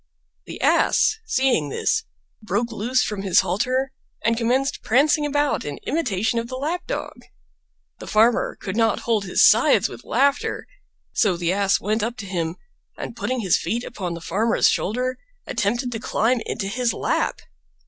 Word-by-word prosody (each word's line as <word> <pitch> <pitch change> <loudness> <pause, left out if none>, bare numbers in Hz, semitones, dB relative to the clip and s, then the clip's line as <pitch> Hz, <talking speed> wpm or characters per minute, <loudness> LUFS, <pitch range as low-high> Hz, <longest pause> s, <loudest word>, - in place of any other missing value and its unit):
The - - -8
Ass, 435 - +3
seeing 255 - +1
this, - - 0 0.4
broke 235 +2 -1
loose 235 +4 0
from 210 -2 -3
his 190 -3 +4
halter 255 +6 -1 0.3
and 230 +1 +3
commenced 250 +4 0
prancing 295 +5 +3
about 290 0 0
in 145 -1 -5
imitation 230 - 0
of 230 - -4
the 255 - -6
Lap 310 +7 -3
dog. - - -4 0.9
The - - -9
Farmer 225 +2 +2
could 195 -1 -5
not 225 -2 +2
hold 220 -4 0
his 180 - +5
sides - - +4
with - - -10
laughter, 280 +1 0 0.5
so 190 -5 +2
the 175 +1 0
Ass 200 0 +2
went 215 +2 -1
up 235 +3 -3
to 215 - -7
him, 170 -3 -3 0.4
and - - -6
putting 255 -1 -2
his 190 -5 +2
feet 225 +8 -2
upon 180 -7 -5
the 170 - -8
Farmer's 215 +8 +2
shoulder 250 +5 -1 0.3
attempted 240 +5 -1
to 225 - -4
climb 230 +2 +1
into 205 - -3
his 245 +3 0
lap. - - -1
230 Hz, 165 wpm, -22 LUFS, 200-255 Hz, 0.9 s, his